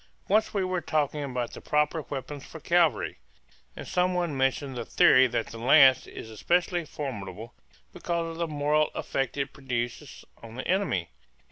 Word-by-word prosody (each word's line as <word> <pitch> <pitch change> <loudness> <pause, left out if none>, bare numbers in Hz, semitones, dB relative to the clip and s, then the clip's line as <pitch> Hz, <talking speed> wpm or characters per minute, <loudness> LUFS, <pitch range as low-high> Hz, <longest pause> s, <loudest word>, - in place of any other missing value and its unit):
Once 215 +3 +2
we 200 -2 0
were 185 -1 -1
talking 150 -2 -1
about 125 -3 -3
the - - -9
proper 150 +2 +1
weapons 140 0 -6
for 160 - -10
cavalry, 165 -6 +1 0.6
and - - -8
some 180 0 +1
one 175 -5 -1
mentioned 135 0 0
the 120 - -3
theory 130 +3 +5
that 120 -2 -1
the 115 - -8
lance 130 +2 +6
is 110 - -9
especially 175 - 0
formidable 115 - -7 0.4
because 170 -1 -2
of 165 - -9
the 170 0 -1
moral 150 0 +1
effect 135 0 -2
it 140 - -2
produces 120 -3 -5 0.2
on 115 0 -11
the 130 - -5
enemy. 175 - 0
145 Hz, 165 wpm, -27 LUFS, 125-170 Hz, 0.6 s, lance